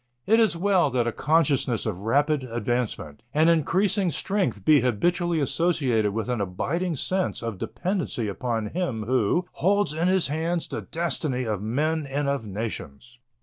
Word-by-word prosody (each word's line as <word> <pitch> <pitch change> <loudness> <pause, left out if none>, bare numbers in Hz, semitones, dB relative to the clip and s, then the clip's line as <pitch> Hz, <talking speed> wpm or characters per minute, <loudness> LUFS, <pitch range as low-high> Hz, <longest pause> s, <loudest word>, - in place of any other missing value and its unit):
It 225 +2 +4
is 220 -6 +3
well 185 -3 +3
that 125 -3 0
a 120 - 0
consciousness 140 -6 +1
of 90 - -3
rapid 140 +7 +1
advancement 115 - -3
and 160 +2 +5
increasing 185 +4 +2
strength 145 - -1
be 150 -3 +6
habitually 170 - +1
associated 140 -7 +1
with 110 +2 -3
an 125 -4 -1
abiding 160 - -2
sense 185 0 -1
of 115 -5 -4
dependence 185 0 -3
upon 110 0 -2
Him 160 -11 -2
who 130 - +1
holds 200 -2 +1
in 165 +3 0
His 185 -1 +3
hands 165 +3 -1
the - - -4
destiny 150 -5 -2
of 105 -5 -2
men 150 +7 -1
and 140 +1 -2
of 140 -6 -1
nations. 110 - -6
140 Hz, 155 wpm, -25 LUFS, 115-170 Hz, -, be